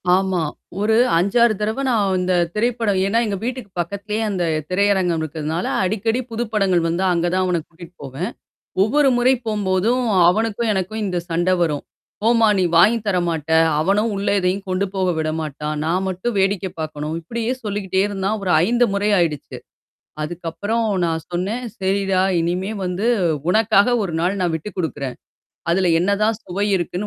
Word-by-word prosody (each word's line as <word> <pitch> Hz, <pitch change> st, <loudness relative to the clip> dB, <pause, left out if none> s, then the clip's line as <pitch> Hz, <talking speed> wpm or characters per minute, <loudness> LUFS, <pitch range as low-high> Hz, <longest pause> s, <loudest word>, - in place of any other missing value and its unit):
ஆமா. 190 Hz, -2 st, 0 dB, 0.4 s
ஒரு 220 Hz, +1 st, +2 dB, 0.2 s
5-6 215 Hz, +6 st, +3 dB
தடவ 220 Hz, +6 st, -1 dB
நான் 200 Hz, -6 st, +2 dB
இந்த 180 Hz, 0 st, 0 dB, 0.2 s
திரைப்படம் 225 Hz, -3 st, 0 dB
ஏன்னா 200 Hz, +4 st, +1 dB
எங்க 205 Hz, -2 st, -2 dB
வீட்டுக்கு 245 Hz, -3 st, -4 dB
பக்கத்லயே 200 Hz, +5 st, -3 dB
அந்த 185 Hz, -3 st, -1 dB, 0.3 s
திரையரங்கம் 185 Hz, -3 st, +2 dB
இருக்றதுனால, 155 Hz, +2 st, -3 dB, 0.2 s
அடிக்கடி 220 Hz, +5 st, 0 dB
புது 230 Hz, +1 st, -1 dB
படங்கள் 190 Hz, -5 st, +2 dB
வந்தால் 180 Hz, +2 st, +1 dB
அங்கேதான் 175 Hz, +2 st, +1 dB
அவனைக் 170 Hz, -3 st, -1 dB
கூட்டிட்டு 170 Hz, +1 st, -14 dB
போவேன். 140 Hz, +7 st, -4 dB, 0.5 s
ஒவ்வொரு 275 Hz, +7 st, +3 dB
முறை 255 Hz, +2 st, +4 dB
போகும்போதும், 210 Hz, +3 st, +1 dB, 0.3 s
அவனுக்கும் 220 Hz, +3 st, +1 dB
எனக்கும் 200 Hz, +3 st, -2 dB
இந்த 180 Hz, -2 st, -1 dB
சண்ட 175 Hz, +2 st, +1 dB
வரும். 150 Hz, -4 st, 0 dB, 0.4 s
"போம்மா 230 Hz, 0 st, +4 dB
நீ 185 Hz, -, +3 dB
வாங்கி 220 Hz, +7 st, +6 dB
தர 185 Hz, -3 st, +2 dB
மாட்ட". 160 Hz, -2 st, -3 dB, 0.3 s
அவனும் 205 Hz, +7 st, +1 dB
உள்ள 200 Hz, +1 st, -2 dB
எதையும் 190 Hz, +2 st, -1 dB
கொண்டு 185 Hz, +2 st, 0 dB
போக 190 Hz, -1 st, 0 dB
விடமாட்டான். 155 Hz, -1 st, -3 dB
நான் 185 Hz, +4 st, 0 dB
மட்டும் 190 Hz, +5 st, -3 dB
வேடிக்கை 190 Hz, -1 st, +1 dB
பாக்கணும். 155 Hz, 0 st, -4 dB
இப்படியே 230 Hz, +7 st, -2 dB
சொல்லிக்கிட்டே 195 Hz, -2 st, -1 dB
இருந்தான். 200 Hz, +1 st, -2 dB
ஒரு 180 Hz, -, +1 dB
5 240 Hz, +1 st, +3 dB
முறை 205 Hz, +1 st, +1 dB
ஆயிடுச்சு. 160 Hz, -5 st, -1 dB, 0.7 s
அதுக்கப்புறம் 175 Hz, +8 st, -2 dB, 0.2 s
நான் 160 Hz, -1 st, -2 dB
சொன்னேன், 200 Hz, +8 st, -2 dB, 0.2 s
சரிடா 195 Hz, 0 st, +1 dB, 0.2 s
இனிமேல் 190 Hz, +5 st, -2 dB
வந்து 180 Hz, +4 st, -2 dB, 0.4 s
உனக்காக 220 Hz, +3 st, +4 dB
1 180 Hz, -5 st, -3 dB
நாள் 185 Hz, +4 st, 0 dB
நான் 175 Hz, -2 st, 0 dB
விட்டுக் 160 Hz, +6 st, -5 dB
குடுக்கிறேன். 140 Hz, -6 st, -3 dB, 0.6 s
அதில 180 Hz, +1 st, +2 dB
என்னதான் 200 Hz, +4 st, +1 dB
சுவை 190 Hz, +2 st, -2 dB
இருக்குன்னு 180 Hz, +3 st, -3 dB
190 Hz, 150 wpm, -20 LUFS, 175-215 Hz, 0.7 s, வாங்கி